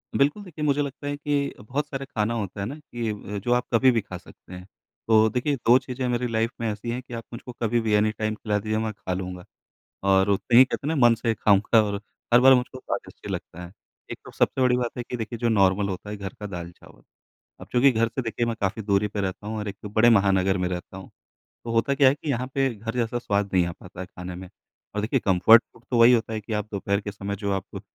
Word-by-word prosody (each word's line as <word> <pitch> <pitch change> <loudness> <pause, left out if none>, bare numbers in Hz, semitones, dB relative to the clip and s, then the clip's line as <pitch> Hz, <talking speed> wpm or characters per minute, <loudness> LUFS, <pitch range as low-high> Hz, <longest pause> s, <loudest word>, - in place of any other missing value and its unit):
बिल्कुल, 145 +9 +2
देखिए 160 -5 -8
मुझे 145 0 +2
लगता 145 +1 -5
है 145 - -2
कि 145 -1 -1
अ, - - -16
बहुत 140 +7 -3
सारे 135 -2 -5
खाना 115 -4 -1
होता 100 -4 -4
है - - -2
ना 130 +7 -5
कि 120 -6 -5
अ, 105 -1 -5
जो 120 +5 0
आप 125 - +1
कभी 130 +3 +5
भी 115 - +1
खा 90 -2 -8
सकते 90 +1 -16
हैं। 90 0 -9 0.4
तो 110 -1 +5
देखिए, 125 +5 0
2 120 0 +4
चीज़ें 125 0 -4
मेरी 125 0 0
लाइफ 115 0 0
में 115 - 0
ऐसी 105 +3 -6
हैं 125 - -3
कि 125 - -13
आप 115 -1 -5
मुझको 120 +2 -8
कभी 120 +1 +1
भी 110 -1 0
एनीटाइम 110 +1 +1
खिला 105 -1 -1
दीजिए, 110 +1 -2
मैं 110 0 -1
खा 95 -2 -5
लूँगा, 90 -1 -5 0.6
और 95 0 +3
उतने 110 +4 +2
ही, 130 - +10
कहते 140 - -4
हैं 160 - 0
ना, 125 -5 +6
मन 115 - +4
से 115 0 -1
खाऊँगा 105 +3 +4
और 100 -1 -3 0.3
हर 120 - +8
बार 135 0 +8
मुझको 130 +1 0
स्वादिष्ट - - -6
ही - - -4
लगता 90 +2 -7
है। 85 - -12 0.4
एक - - -5
तो - - -10
सबसे 130 - 0
बड़ी 125 -1 +4
बात 125 0 -3
है 120 - -3
कि 125 - -5
देखिए 115 +1 -5
जो 120 0 +1
नॉर्मल 100 -1 +3
होता 95 +2 -6
है 105 - -4
घर 100 -1 -6
का 105 - -6
दाल-चावल। 85 -2 -10 0.6
अब - - -10
चूंकि 130 +2 +5
घर 115 0 +1
से 125 +4 -4
देखिए 115 0 -2
मैं 115 -1 -2
काफ़ी 100 +3 -1
दूरी 100 0 +2
पे 105 0 -4
रहता 95 +2 -4
हूँ 110 - -3
और 105 - -4
एक 100 - -6
बड़े 110 +3 +4
महानगर 95 -3 +3
में 90 -1 -1
रहता 90 +1 -6
हूँ, 95 - -10 0.6
तो 115 - -5
होता 115 +5 +2
क्या 135 -1 +6
है 130 - +3
कि 145 0 -5
यहाँ 125 0 -1
पे 135 -1 +2
घर 115 +2 -6
जैसा 120 0 0
स्वाद 100 -3 -1
नहीं 90 -2 +3
आ 85 - -4
पाता 90 +1 -12
है 95 - -5
खाने 90 0 -8
में। 95 0 -9 0.5
और 105 - -1
देखिए 120 +5 0
कंफ़र्ट 100 +4 +6
फ़ूड 115 - -21
तो 120 - +2
वही 115 +2 +8
होता 115 -1 +1
है 110 - -2
कि 105 +2 -8
आप 105 0 -2
दोपहर 100 0 -1
के 105 -1 -6
समय 100 0 -5
जो 100 0 -2
आप 95 -2 -4
110 Hz, 265 wpm, -25 LUFS, 100-125 Hz, 0.6 s, ही